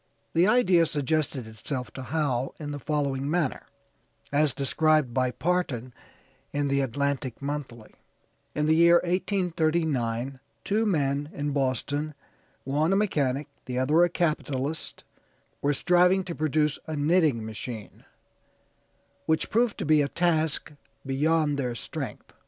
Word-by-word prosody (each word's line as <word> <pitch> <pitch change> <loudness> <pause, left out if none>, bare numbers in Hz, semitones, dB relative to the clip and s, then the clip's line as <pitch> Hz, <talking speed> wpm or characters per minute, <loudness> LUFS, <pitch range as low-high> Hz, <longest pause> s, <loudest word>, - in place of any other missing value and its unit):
The 170 +3 +4
idea 185 -8 +4
suggested 145 -3 -1
itself 110 +2 -5
to 130 - -8
Howe 135 -2 -1
in 145 -2 -5
the 145 - -5
following 140 -2 -1
manner, 160 -4 -1 0.6
as 145 0 +3
described 150 0 +2
by 130 0 +2
Parton 130 -5 -1 0.6
in 145 0 0
the 140 0 +2
Atlantic 135 -1 -2
Monthly: 140 -6 -5 0.6
"In 150 - +1
the 155 - +4
year 170 +1 +6
1839 160 - 0 0.2
two 215 +2 +1
men 145 -5 0
in 145 0 -2
Boston, 145 +2 -1 0.5
one 150 +6 +1
a - - +3
mechanic, 150 -9 0 0.2
the 125 -1 -4
other 150 +7 +4
a 175 - +3
capitalist, 150 -3 -2 0.6
were 145 - +2
striving 180 +5 +3
to 180 - -5
produce 155 -1 0
a 155 - -3
knitting 150 -6 +2
machine, 110 0 -7 1.2
which 160 0 +1
proved 230 0 +2
to - - -3
be 155 -1 +5
a 140 - +1
task 160 -2 0 0.3
beyond 145 +2 +1
their 125 -3 -2
strength. - - -6
145 Hz, 130 wpm, -27 LUFS, 135-160 Hz, 1.2 s, year